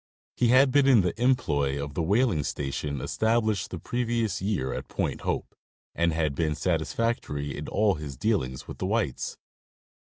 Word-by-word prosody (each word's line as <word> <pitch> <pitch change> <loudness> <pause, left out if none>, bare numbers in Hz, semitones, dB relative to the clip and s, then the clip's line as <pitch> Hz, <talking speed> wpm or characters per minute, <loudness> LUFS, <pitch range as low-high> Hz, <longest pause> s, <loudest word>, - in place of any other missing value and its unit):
He 125 - +2
had 130 +3 +5
been 140 0 +4
in 125 -6 +7
the 90 +5 -2
employ 75 - +2
of 70 0 -5
the 85 - -1
whaling 100 - +2
station 70 0 -3
established 110 - +1
the 90 - -5
previous 115 -2 -1
year 95 -10 -1
at - - -5
Point - - -2
Hope, - - -2 0.4
and 85 0 +2
had 80 -2 0
been 75 +1 0
satis 80 -2 -1
factory 75 - -2
in 75 - -6
all 105 -1 +2
his 75 -5 -7
dealings 65 - -1
with - - -8
the 95 - -1
whites. 105 - -1
90 Hz, 170 wpm, -27 LUFS, 75-115 Hz, 0.4 s, in